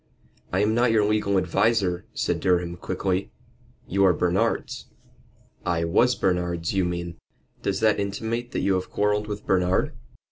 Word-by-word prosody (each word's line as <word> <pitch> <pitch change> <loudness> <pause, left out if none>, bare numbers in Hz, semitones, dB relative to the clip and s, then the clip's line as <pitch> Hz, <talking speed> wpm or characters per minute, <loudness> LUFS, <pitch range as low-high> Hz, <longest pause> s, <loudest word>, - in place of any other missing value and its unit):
"I 95 - +1
am 105 +1 +2
not 120 +2 +3
your 110 -2 +3
legal 105 -2 +1
adviser," 95 0 +1
said - - 0
Durham, 90 -1 +1
quickly. 95 +2 -2 0.6
"You 100 +1 +1
are 90 - +5
Bernard's." 90 +2 -1 0.8
"I 85 -1 0
was 120 +9 +3
Bernard's, 90 -3 -1
you 95 -2 +1
mean." 85 -1 -4 0.4
"Does 100 0 -1
that 110 -2 +3
intimate 110 +4 -3
that - - -3
you 100 - +2
have 95 0 -2
quarrelled 105 0 0
with 105 0 -6
Bernard?" 90 -1 +1
95 Hz, 150 wpm, -25 LUFS, 90-105 Hz, 0.8 s, are